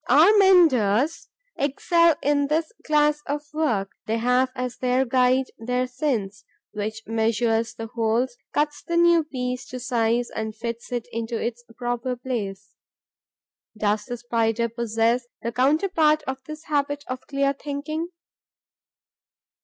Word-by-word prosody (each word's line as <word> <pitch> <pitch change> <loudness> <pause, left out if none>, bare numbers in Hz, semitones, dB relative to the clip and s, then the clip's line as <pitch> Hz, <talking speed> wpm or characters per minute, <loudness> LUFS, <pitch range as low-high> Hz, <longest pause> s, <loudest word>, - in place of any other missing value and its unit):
Our 320 - +7
menders 310 - +4 0.3
excel 335 +4 +3
in 285 0 +2
this 315 +2 0 0.2
class 300 -1 +3
of 290 +1 -2
work. 230 -11 0 0.2
They 225 +1 0
have 250 +2 +2
as 250 -1 -4
their 255 +1 +1
guide 255 +1 +2
their 250 +2 0
sense, 245 -7 -2 0.3
which 215 +2 -4
measures 225 0 0
the 225 - -5
holes, 230 +2 0 0.2
cuts 295 0 0
the 340 - -2
new 340 -1 +5
piece 250 -3 -4
to 255 - -6
size 240 -1 0
and 220 -1 -4
fits 235 +1 -6
it 240 -2 -3
into 230 0 -3
its 240 0 -3
proper 245 +1 -2
place. 205 -6 -5 1.0
Does 210 0 0
the 245 -1 -5
Spider 230 -1 0
possess 230 +1 0 0.2
the 235 - -1
counterpart 305 - +2
of 265 -1 -5
this 310 +1 -8
habit 290 -1 -1
of 255 0 -6
clear 275 0 +1
thinking? 295 +4 -4
250 Hz, 135 wpm, -24 LUFS, 230-290 Hz, 1.0 s, Our